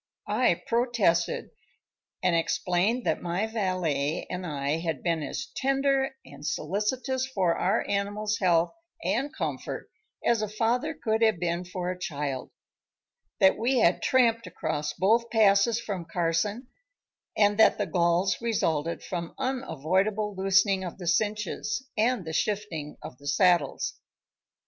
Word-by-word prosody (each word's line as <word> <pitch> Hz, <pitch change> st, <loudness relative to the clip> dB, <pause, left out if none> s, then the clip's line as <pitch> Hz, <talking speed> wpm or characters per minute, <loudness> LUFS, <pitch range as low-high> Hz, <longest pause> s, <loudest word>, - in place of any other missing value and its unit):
I -, -, +2 dB
protested, 230 Hz, -8 st, +1 dB, 0.7 s
and 180 Hz, -2 st, +3 dB
explained 180 Hz, +7 st, +1 dB
that -, -, 0 dB
my 175 Hz, +4 st, -1 dB
valet 185 Hz, -9 st, -1 dB
and 180 Hz, 0 st, -4 dB
I 145 Hz, +1 st, -1 dB
had 165 Hz, -5 st, -3 dB
been 165 Hz, -2 st, 0 dB
as 270 Hz, -, -4 dB
tender 270 Hz, 0 st, +1 dB
and 140 Hz, 0 st, -13 dB
solicitous 245 Hz, -, -1 dB
for 190 Hz, -10 st, +1 dB
our 200 Hz, +5 st, 0 dB
animals' 205 Hz, +1 st, -1 dB
health 175 Hz, -3 st, +3 dB, 0.3 s
and 275 Hz, +4 st, 0 dB
comfort -, -, -4 dB, 0.3 s
as 235 Hz, -2 st, +3 dB
a 215 Hz, -, -1 dB
father 225 Hz, +3 st, 0 dB
could 220 Hz, 0 st, -1 dB
have 220 Hz, -6 st, +3 dB
been 175 Hz, +1 st, -1 dB
for 180 Hz, 0 st, -3 dB
a 180 Hz, -, -7 dB
child; 145 Hz, -6 st, -3 dB, 0.9 s
that 190 Hz, -, +5 dB
we 250 Hz, +4 st, +2 dB
had 180 Hz, -6 st, +3 dB
tramped 230 Hz, -3 st, +3 dB
across 150 Hz, 0 st, -3 dB
both 230 Hz, +6 st, +2 dB
passes 215 Hz, +1 st, +4 dB
from 200 Hz, -7 st, -4 dB
Carson; 170 Hz, +8 st, -1 dB, 0.7 s
and 205 Hz, 0 st, +3 dB
that 220 Hz, -, +6 dB
the 205 Hz, -, 0 dB
galls 175 Hz, +3 st, +1 dB
resulted 165 Hz, -9 st, 0 dB
from 170 Hz, -2 st, -5 dB
unavoidable 210 Hz, -, 0 dB
loosening 195 Hz, 0 st, +3 dB
of 180 Hz, -, -6 dB
the 180 Hz, -, -8 dB
cinches 210 Hz, +5 st, -1 dB
and 225 Hz, -3 st, +1 dB
the 160 Hz, -, -5 dB
shifting 170 Hz, -6 st, -2 dB
of 125 Hz, -, -9 dB
the 145 Hz, -, -10 dB
saddles. 170 Hz, -1 st, +2 dB
195 Hz, 135 wpm, -27 LUFS, 170-225 Hz, 0.9 s, that